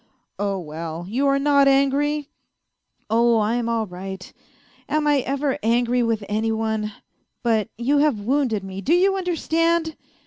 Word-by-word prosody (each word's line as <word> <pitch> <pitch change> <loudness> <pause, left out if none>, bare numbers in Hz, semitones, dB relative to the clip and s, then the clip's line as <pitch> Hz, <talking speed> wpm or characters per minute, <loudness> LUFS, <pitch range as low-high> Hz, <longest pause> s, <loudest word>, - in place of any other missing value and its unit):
" - - -51
Oh, 200 -1 -1
well, 165 0 -6
you 260 +8 0
are 275 0 +3
not 280 0 +4
angry? 280 +2 +2 0.3
" - - -56
" - - -47
Oh, 235 +1 +4
I'm 230 +2 0
all 230 -1 0
right; 190 0 -8 0.6
am 305 0 +1
I 290 -1 +3
ever 275 +1 -1
angry 240 +2 +2
with 225 -3 0
any 220 +2 0
one! 220 -1 -2 0.5
But 225 -3 +1
you 275 +5 +2
have 290 -7 +2
wounded 240 -3 0
me, 190 0 -7
do 315 +11 +2
you 385 +2 +3
understand 335 -3 0
240 Hz, 165 wpm, -22 LUFS, 215-290 Hz, 0.6 s, not